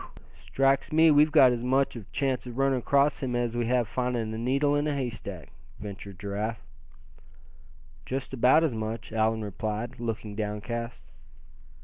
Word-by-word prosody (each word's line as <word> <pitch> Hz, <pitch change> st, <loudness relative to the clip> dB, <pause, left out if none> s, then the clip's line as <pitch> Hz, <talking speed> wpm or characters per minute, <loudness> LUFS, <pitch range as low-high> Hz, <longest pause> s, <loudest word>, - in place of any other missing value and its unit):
"Whew! -, -, -14 dB
strikes 135 Hz, 0 st, 0 dB
me 160 Hz, +1 st, +6 dB
we've 150 Hz, +1 st, +5 dB
got 135 Hz, -5 st, +7 dB
as 120 Hz, -1 st, -2 dB
much 135 Hz, +2 st, +1 dB, 0.2 s
chance 135 Hz, -3 st, -1 dB
of 120 Hz, 0 st, -8 dB
running 135 Hz, -1 st, +2 dB
across 140 Hz, +4 st, +2 dB
him 125 Hz, -3 st, -2 dB
as 120 Hz, -1 st, -1 dB
we'd 120 Hz, -1 st, -1 dB
have 125 Hz, -2 st, +1 dB
finding 120 Hz, -2 st, -2 dB
a -, -, -4 dB
needle 140 Hz, +4 st, +1 dB
in 145 Hz, +1 st, 0 dB
a 150 Hz, -, -1 dB
haystack," 110 Hz, -, -5 dB, 0.3 s
ventured 100 Hz, -1 st, -8 dB
Giraffe. 105 Hz, 0 st, -4 dB, 1.4 s
"Just 135 Hz, +1 st, -4 dB
about 130 Hz, +5 st, +4 dB
as 155 Hz, -6 st, +1 dB
much," 110 Hz, 0 st, -5 dB
Allan 110 Hz, 0 st, +1 dB
replied, 110 Hz, +4 st, -4 dB
looking 110 Hz, -3 st, -4 dB
downcast. 110 Hz, +1 st, -4 dB
120 Hz, 155 wpm, -27 LUFS, 110-135 Hz, 1.4 s, got